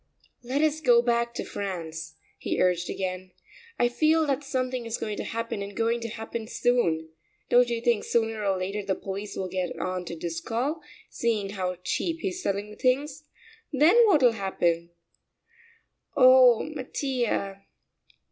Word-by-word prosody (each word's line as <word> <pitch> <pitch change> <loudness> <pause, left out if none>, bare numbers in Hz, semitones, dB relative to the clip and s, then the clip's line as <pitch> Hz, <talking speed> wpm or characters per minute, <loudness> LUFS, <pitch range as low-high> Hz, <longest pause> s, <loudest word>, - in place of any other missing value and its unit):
"Let 260 +5 -1
us 310 0 +1
go 240 -5 +5
back 235 0 +1
to - - -3
France," 165 -5 -5 0.2
he - - -2
urged 180 -1 +2
again. 185 -1 -4 0.4
"I 240 - +3
feel 310 +6 +2
that 280 0 -1
something 255 -3 -2
is 225 - -2
going 210 -1 -3
to - - -3
happen, 230 -2 -4
and 200 0 -7
going 230 +1 +1
to 230 - -3
happen 225 0 -6
soon. 175 -11 +1 0.4
Don't 245 0 +5
you 235 -1 -2
think 235 -3 +2
sooner 225 -2 0
or 195 -2 +1
later 195 +3 -3
the 195 -1 -1
police 200 +2 -6
will 190 - -3
get 185 -1 -3
on 185 -1 -3
to 170 - -6
Driscoll, 225 - -3 0.3
seeing 215 -4 -1
how 185 -2 -2
cheap 330 - -2
he's 370 -1 -3
selling 200 - -2
the 210 - -12
things? 280 +3 0 0.5
Then 300 - +5
what'll 285 - +5
happen?" 175 -5 -1 1.3
"Oh, 255 -2 +7
Mattia...." 250 -8 -3
230 Hz, 155 wpm, -27 LUFS, 190-255 Hz, 1.3 s, Oh